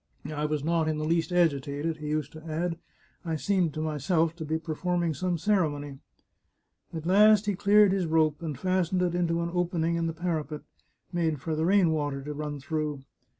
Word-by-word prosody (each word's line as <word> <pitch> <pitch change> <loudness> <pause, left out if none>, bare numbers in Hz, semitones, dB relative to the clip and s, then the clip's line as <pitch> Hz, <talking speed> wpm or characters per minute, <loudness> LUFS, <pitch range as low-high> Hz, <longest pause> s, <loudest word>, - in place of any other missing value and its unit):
" - - -32
I 150 0 -3
was 150 -2 -1
not 165 0 +1
in 155 -1 0
the 155 - -2
least 165 0 +1
agi 170 -6 +3
tated," 145 +4 -3
he 150 -1 -7
used 155 -1 -2
to 155 0 -11
add; 165 +1 -3 0.2
" - - -33
I 165 -2 -2
seemed 170 +1 0
to 155 - -2
myself 160 +2 0
to 160 - -5
be 160 +1 -1
perform 175 +2 -2
ing 165 -2 0
some 175 +4 -1
ceremony." 150 -7 0 0.9
At 160 -1 -6
last 210 +3 +6
he 205 - +1
cleared 205 +1 +5
his 190 -3 0
rope, 155 -1 +2
and 155 -5 -4
fastened 185 +2 +1
it 175 -1 0
into 170 -1 0
an 170 - -3
open 175 -2 0
ing 170 +1 +1
in 165 0 0
the 165 - -2
parapet, 160 -3 -3 0.5
made 165 -4 0
for 160 +3 -3
the 160 +1 0
rain 190 -3 +4
water 145 -3 -2
to 150 +1 -5
run 150 -1 -5
through. 150 0 -3
160 Hz, 215 wpm, -28 LUFS, 150-175 Hz, 0.9 s, last